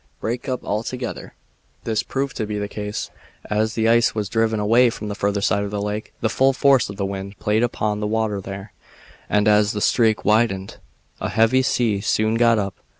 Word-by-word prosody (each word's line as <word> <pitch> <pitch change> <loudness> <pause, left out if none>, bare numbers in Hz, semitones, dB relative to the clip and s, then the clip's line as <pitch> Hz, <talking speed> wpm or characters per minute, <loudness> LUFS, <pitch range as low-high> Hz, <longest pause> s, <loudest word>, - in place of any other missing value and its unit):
"Break 120 +4 -3
up 125 - -3
altogether." 120 +4 -4 0.5
This 110 -2 0
proved 135 -1 -3
to 110 - -2
be 105 0 -3
the 100 0 -2
case. 105 0 -5 0.4
As 110 +1 0
the 110 -1 +1
ice 115 0 +3
was 105 -3 -2
driven 110 -1 +1
away 115 +4 +4
from 105 -2 -6
the - - -3
further 100 0 -1
side 100 0 +1
of 100 - -3
the 105 0 -3
lake 105 +1 -4
the - - +2
full 135 +4 +3
force 135 -3 +3
of 100 - -6
the 100 - -1
wind 100 0 -6
played 105 +1 +1
upon 110 -3 -1
the 105 - -2
water 110 -2 -1
there, 95 +2 -8 0.6
and 105 0 +2
as 105 0 +4
the 105 - -2
streak 110 0 +2
widened 105 -3 +1 0.4
a - - -3
heavy 115 +4 +3
sea 115 -6 +1
soon 110 +1 +1
got 115 0 +4
up. 100 -2 -3
110 Hz, 205 wpm, -22 LUFS, 105-115 Hz, 0.6 s, away